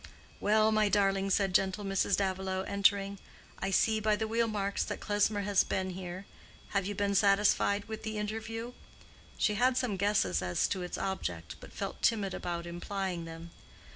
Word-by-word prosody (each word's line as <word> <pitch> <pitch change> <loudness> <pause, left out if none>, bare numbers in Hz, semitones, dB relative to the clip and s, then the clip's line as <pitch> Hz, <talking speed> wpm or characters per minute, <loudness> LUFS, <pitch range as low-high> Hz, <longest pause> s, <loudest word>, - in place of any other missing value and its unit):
"Well, 215 +1 +3
my 215 -1 +3
darling," 195 -1 +2
said 195 -1 +2
gentle 195 +2 +1
Mrs. 195 0 +1
Davilow, 190 -1 -1
entering, 200 0 +1 0.4
"I 195 - -1
see 220 +3 +3
by 215 0 +2
the 220 +1 -2
wheel 230 +1 +1
marks 200 -2 -1
that - - -4
Klesmer 205 0 +1
has 200 -1 +3
been 190 0 -2
here. 180 +1 -7 0.4
Have 200 -2 0
you 205 - -3
been 200 0 0
satisfied 200 0 +3
with 220 0 -6
the 220 -1 -4
interview?" 225 +3 -4 0.6
She 210 - +2
had 250 +4 +2
some 245 -7 0
guesses 185 - +2
as 90 -1 +1
to 190 - -2
its 180 - -4
object, 85 - -3
but - - -12
felt - - -5
timid 205 -5 +2
about 170 -1 -4
implying 175 0 -4
them. 165 +1 -9
200 Hz, 170 wpm, -31 LUFS, 190-210 Hz, 0.6 s, Well